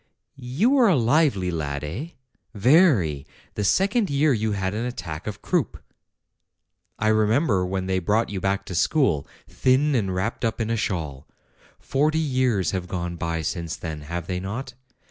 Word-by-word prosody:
"You 140 Hz, -, 0 dB
were 265 Hz, -4 st, +5 dB
a 190 Hz, -, +4 dB
lively 120 Hz, -, +2 dB
lad, 75 Hz, -4 st, -3 dB
eh? 95 Hz, -, -4 dB, 0.5 s
Very. 105 Hz, -, +3 dB, 0.3 s
The 105 Hz, -, -3 dB
second 200 Hz, -, +2 dB
year 140 Hz, +1 st, +3 dB
you 110 Hz, -2 st, 0 dB
had 95 Hz, -1 st, -2 dB
an 110 Hz, +2 st, -2 dB
attack 85 Hz, -10 st, -6 dB
of 105 Hz, -, -6 dB
croup. -, -, 0 dB, 1.2 s
I 110 Hz, -, 0 dB
remember 110 Hz, -, +2 dB
when 95 Hz, 0 st, -2 dB
they 95 Hz, 0 st, 0 dB
brought 105 Hz, +5 st, 0 dB
you 95 Hz, -2 st, -4 dB
back 100 Hz, +1 st, -1 dB
to -, -, -7 dB
school, 90 Hz, -, +1 dB, 0.2 s
thin 135 Hz, +3 st, +2 dB
and 105 Hz, -7 st, 0 dB
wrapped 110 Hz, +7 st, -2 dB
up 115 Hz, 0 st, -1 dB
in 115 Hz, 0 st, -1 dB
a -, -, +1 dB
shawl. 80 Hz, -10 st, -3 dB, 0.5 s
Forty 150 Hz, +3 st, +1 dB
years 130 Hz, -, +1 dB
have 95 Hz, -2 st, -3 dB
gone 85 Hz, -1 st, -4 dB
by 85 Hz, -1 st, -3 dB
since 85 Hz, 0 st, -3 dB
then, 80 Hz, -2 st, -6 dB
have 85 Hz, +3 st, -5 dB
they 90 Hz, 0 st, -3 dB
not? 120 Hz, +8 st, -5 dB
105 Hz, 165 wpm, -24 LUFS, 90-130 Hz, 1.2 s, were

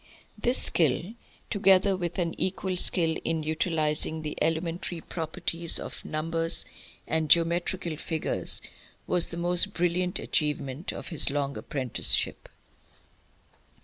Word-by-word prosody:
This 240 Hz, +4 st, +1 dB
skill, 165 Hz, -, +1 dB, 0.4 s
together 195 Hz, -1 st, +3 dB
with 175 Hz, -2 st, -5 dB
an 170 Hz, -3 st, -2 dB
equal 190 Hz, 0 st, -2 dB
skill 165 Hz, -2 st, +1 dB
in 160 Hz, -1 st, -2 dB
utilising 155 Hz, 0 st, +1 dB
the 150 Hz, -, -5 dB
elementary 165 Hz, +1 st, -2 dB
properties 165 Hz, 0 st, -2 dB
of -, -, -7 dB
numbers 165 Hz, +1 st, 0 dB, 0.4 s
and 160 Hz, -1 st, -1 dB
geometrical 170 Hz, 0 st, +1 dB
figures, 160 Hz, 0 st, -2 dB, 0.4 s
was 180 Hz, -2 st, +4 dB
the 170 Hz, -, -6 dB
most 175 Hz, +3 st, +6 dB
brilliant 180 Hz, +1 st, 0 dB
achievement 150 Hz, 0 st, -2 dB
of -, -, -7 dB
his 165 Hz, -5 st, +1 dB
long 140 Hz, 0 st, -3 dB
apprenticeship. 130 Hz, -4 st, +1 dB
165 Hz, 115 wpm, -26 LUFS, 155-180 Hz, 0.4 s, most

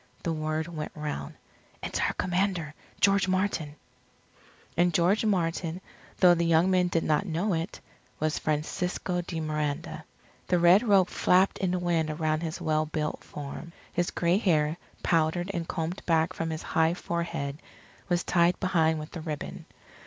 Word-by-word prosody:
The 165 Hz, -, 0 dB
word 155 Hz, 0 st, -2 dB
went 160 Hz, -3 st, -5 dB
round: 150 Hz, -, -5 dB, 0.5 s
"It's -, -, -2 dB
our -, -, +1 dB
Commander, 180 Hz, -4 st, -1 dB, 0.3 s
George 195 Hz, -1 st, +4 dB
Martin." 185 Hz, -6 st, 0 dB, 1.0 s
And 175 Hz, -1 st, +2 dB
George 180 Hz, +6 st, +3 dB
Martin, 170 Hz, -3 st, 0 dB, 0.4 s
though 180 Hz, -2 st, +7 dB
the 170 Hz, 0 st, +1 dB
young 165 Hz, +2 st, +4 dB
men 180 Hz, -1 st, +3 dB
did 165 Hz, -2 st, 0 dB
not 155 Hz, +6 st, +1 dB
know 180 Hz, +5 st, 0 dB
it, 165 Hz, +1 st, -3 dB, 0.4 s
was 155 Hz, 0 st, 0 dB
Francisco 180 Hz, +4 st, -1 dB
de 170 Hz, -1 st, -5 dB
Miranda. 150 Hz, -2 st, -3 dB, 0.4 s
The 180 Hz, -, +3 dB
red 175 Hz, +4 st, +6 dB
robe 200 Hz, -6 st, +4 dB
flapped 185 Hz, +2 st, +3 dB
in 190 Hz, -, +1 dB
the 180 Hz, -, 0 dB
wind 170 Hz, -3 st, 0 dB
around 155 Hz, 0 st, 0 dB
his 165 Hz, 0 st, -4 dB
well 155 Hz, -2 st, 0 dB
built 150 Hz, 0 st, -3 dB
form. 150 Hz, +3 st, -8 dB, 0.2 s
His 175 Hz, 0 st, 0 dB
gray 175 Hz, +3 st, +1 dB
hair, 155 Hz, -6 st, +2 dB, 0.3 s
powdered 170 Hz, +3 st, +1 dB
and 170 Hz, -2 st, -3 dB
combed 165 Hz, +3 st, -3 dB
back 160 Hz, -1 st, +2 dB
from 165 Hz, -, -3 dB
his 160 Hz, -1 st, -4 dB
high 160 Hz, +1 st, +2 dB
forehead, 170 Hz, -5 st, -3 dB, 0.5 s
was 175 Hz, -1 st, +1 dB
tied 170 Hz, 0 st, +3 dB
behind 160 Hz, -4 st, +2 dB
with 155 Hz, +2 st, -8 dB
a 165 Hz, -, -5 dB
ribbon. 155 Hz, -2 st, -6 dB
170 Hz, 160 wpm, -28 LUFS, 155-180 Hz, 1.0 s, though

